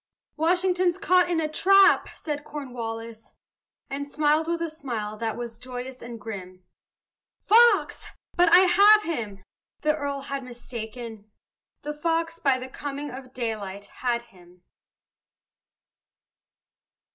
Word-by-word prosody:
"Washington's 360 Hz, +2 st, +2 dB
caught 365 Hz, -2 st, +3 dB
in 340 Hz, -2 st, +1 dB
a 315 Hz, -, 0 dB
trap!" 390 Hz, +6 st, +5 dB
said 295 Hz, -2 st, -5 dB
Cornwallis, 230 Hz, -6 st, -7 dB, 0.5 s
And 285 Hz, +1 st, -5 dB
smiled 305 Hz, +2 st, +1 dB
with 340 Hz, 0 st, -1 dB
a -, -, -1 dB
smile 240 Hz, -9 st, -5 dB
that 225 Hz, 0 st, -3 dB
was 240 Hz, -1 st, -7 dB
joyous 255 Hz, 0 st, -7 dB
and 235 Hz, -1 st, -8 dB
grim; 185 Hz, -4 st, -8 dB, 0.8 s
"Fox! 470 Hz, +3 st, +4 dB, 0.3 s
but 350 Hz, -1 st, +4 dB
I 360 Hz, -, +9 dB
have 405 Hz, +3 st, +6 dB
him!" 215 Hz, -, -4 dB, 0.4 s
the 305 Hz, 0 st, +2 dB
earl 285 Hz, -2 st, -3 dB
had 275 Hz, 0 st, -5 dB
mistaken; 230 Hz, -3 st, -8 dB, 0.5 s
The 295 Hz, -, -4 dB
fox, 330 Hz, +2 st, -1 dB
by 270 Hz, -2 st, +2 dB
the 255 Hz, 0 st, -7 dB
coming 285 Hz, +1 st, -6 dB
of 255 Hz, 0 st, -10 dB
daylight, 210 Hz, -5 st, -4 dB, 0.2 s
had 240 Hz, -2 st, 0 dB
him. 180 Hz, -5 st, -21 dB
275 Hz, 120 wpm, -25 LUFS, 230-330 Hz, 0.8 s, I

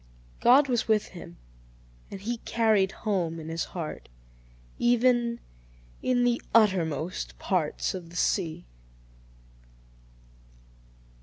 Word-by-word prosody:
God 270 Hz, +4 st, +6 dB
was 240 Hz, -3 st, 0 dB
with 215 Hz, -2 st, +2 dB
him, 170 Hz, -, -11 dB, 0.7 s
and 195 Hz, -, -7 dB
he 235 Hz, +4 st, -3 dB
carried 220 Hz, -4 st, +2 dB
home 175 Hz, -6 st, 0 dB
in 160 Hz, 0 st, -8 dB
his 165 Hz, +1 st, -2 dB
heart, 165 Hz, -, -7 dB, 0.7 s
even 240 Hz, -1 st, +2 dB, 0.6 s
"in 250 Hz, -1 st, +2 dB
the 245 Hz, 0 st, +1 dB
uttermost 180 Hz, -6 st, +1 dB
parts 175 Hz, -6 st, -1 dB
of 180 Hz, -3 st, -7 dB
the 170 Hz, -, -14 dB
sea." 170 Hz, -, 0 dB
200 Hz, 100 wpm, -27 LUFS, 170-235 Hz, 0.7 s, God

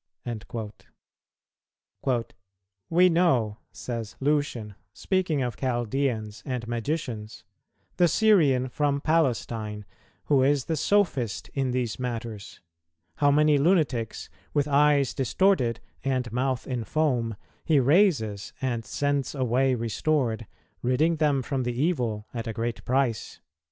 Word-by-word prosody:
"[229:4] 120 Hz, -4 st, -1 dB, 0.6 s
"We 180 Hz, +2 st, +5 dB
know," 130 Hz, -12 st, +2 dB
says 115 Hz, -3 st, -6 dB
Lucian, 135 Hz, -7 st, 0 dB, 0.2 s
speaking 180 Hz, -7 st, 0 dB
of 120 Hz, -3 st, -3 dB
Chaldeans 120 Hz, -3 st, -1 dB
and 125 Hz, -3 st, -4 dB
Magicians, 120 Hz, -3 st, -4 dB, 0.5 s
"the 175 Hz, -, +5 dB
Syrian 155 Hz, -12 st, +4 dB
from 140 Hz, +2 st, 0 dB
Palestine, 115 Hz, -9 st, 0 dB, 0.4 s
who 140 Hz, -3 st, +3 dB
is 140 Hz, 0 st, +2 dB
the 160 Hz, -, -1 dB
sophist 150 Hz, -, 0 dB
in 135 Hz, -2 st, 0 dB
these 125 Hz, -2 st, -2 dB
matters, 115 Hz, -4 st, -5 dB, 0.6 s
how 145 Hz, -2 st, +4 dB
many 150 Hz, 0 st, +4 dB
lunatics, 145 Hz, -, +1 dB, 0.2 s
with 145 Hz, -1 st, +2 dB
eyes 145 Hz, -2 st, +3 dB
distorted 130 Hz, -, +2 dB, 0.2 s
and 130 Hz, -3 st, -1 dB
mouth 130 Hz, +1 st, -1 dB
in 125 Hz, -3 st, -3 dB
foam, 125 Hz, -5 st, 0 dB, 0.3 s
he 155 Hz, -3 st, +3 dB
raises 135 Hz, -, +2 dB
and 125 Hz, -4 st, -2 dB
sends 145 Hz, +4 st, -1 dB
away 130 Hz, 0 st, +2 dB
restored, 115 Hz, -1 st, -1 dB, 0.3 s
ridding 155 Hz, +7 st, +2 dB
them 145 Hz, -4 st, +2 dB
from 135 Hz, 0 st, -2 dB
the 120 Hz, 0 st, -3 dB
evil 125 Hz, -10 st, 0 dB
at 115 Hz, -1 st, -4 dB
a 115 Hz, -, -3 dB
great 115 Hz, +1 st, -3 dB
price." 125 Hz, -4 st, 0 dB
130 Hz, 115 wpm, -26 LUFS, 115-150 Hz, 0.6 s, We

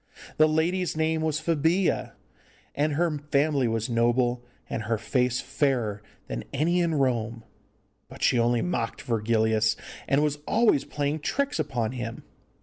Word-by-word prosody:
The 155 Hz, -, +6 dB
lady's 170 Hz, +2 st, 0 dB
name 160 Hz, 0 st, +1 dB
was 155 Hz, -1 st, 0 dB
Febilla, 165 Hz, +3 st, +1 dB, 0.6 s
and 150 Hz, +1 st, 0 dB
her 160 Hz, -1 st, 0 dB
family 140 Hz, -2 st, +2 dB
was 115 Hz, -1 st, -1 dB
noble, 120 Hz, +1 st, +1 dB, 0.2 s
and 115 Hz, -, -3 dB
her 115 Hz, +1 st, 0 dB
face 125 Hz, +2 st, 0 dB
fairer 120 Hz, -8 st, 0 dB, 0.2 s
than -, -, -5 dB
any 165 Hz, +6 st, +1 dB
in 165 Hz, -2 st, +1 dB
Rome, 120 Hz, -4 st, 0 dB, 0.7 s
but -, -, -9 dB
she 120 Hz, -, +4 dB
only 120 Hz, 0 st, +2 dB
mocked 120 Hz, -10 st, -2 dB
Virgilius, 110 Hz, -1 st, +1 dB, 0.3 s
and 140 Hz, +2 st, +3 dB
was 150 Hz, -1 st, 0 dB
always 220 Hz, -, +3 dB
playing 145 Hz, +1 st, -2 dB
tricks 280 Hz, -, -1 dB
upon 115 Hz, -3 st, -1 dB
him. 120 Hz, -2 st, -6 dB
135 Hz, 145 wpm, -26 LUFS, 115-155 Hz, 0.7 s, The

